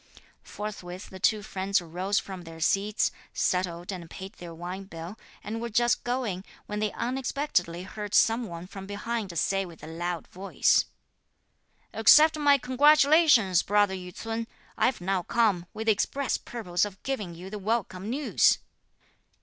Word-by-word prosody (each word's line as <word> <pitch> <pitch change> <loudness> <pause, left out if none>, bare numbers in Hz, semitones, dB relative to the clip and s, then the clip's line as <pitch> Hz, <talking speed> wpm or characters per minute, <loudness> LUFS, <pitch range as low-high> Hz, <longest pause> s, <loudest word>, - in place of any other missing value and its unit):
Forthwith 195 -3 -7
the 190 - -9
two 210 +2 +2
friends 195 0 0
rose 180 +4 -2
from 190 -2 -3
their 165 -1 -11
seats, 200 +5 +1 0.2
settled 180 0 -1
and 175 -3 -7
paid 190 +3 -8
their 175 -1 -10
wine 180 +4 -6
bill, 170 +1 -8 0.3
and 225 +2 -4
were 235 - -3
just 240 +2 +2
going, 240 -7 -2 0.2
when 210 0 -4
they 215 -1 0
unexpectedly 250 - -1
heard 205 +2 -5
some 225 +1 +4
one 170 -1 -7
from 195 +1 -9
behind 205 -2 -4
say 195 +4 +1
with 170 -5 -12
a - - -7
loud 170 +1 -4
voice: 190 +2 +2 1.1
"Accept 305 +8 +7
my 285 -1 +5
congratulations, 280 - +5
Brother 205 -1 +2
Yü 180 -1 -6
ts'un; 225 0 -4 0.3
I've 255 - +1
now 190 +1 0
come, 200 -4 +1
with 220 - -6
the 225 - +5
express 265 +6 0
purpose 180 -7 -2
of 200 -2 -4
giving 210 -11 -3
you 185 +3 -9
the 210 - -5
welcome 205 -2 -2
news!" 275 +4 +3
200 Hz, 155 wpm, -27 LUFS, 180-230 Hz, 1.1 s, Accept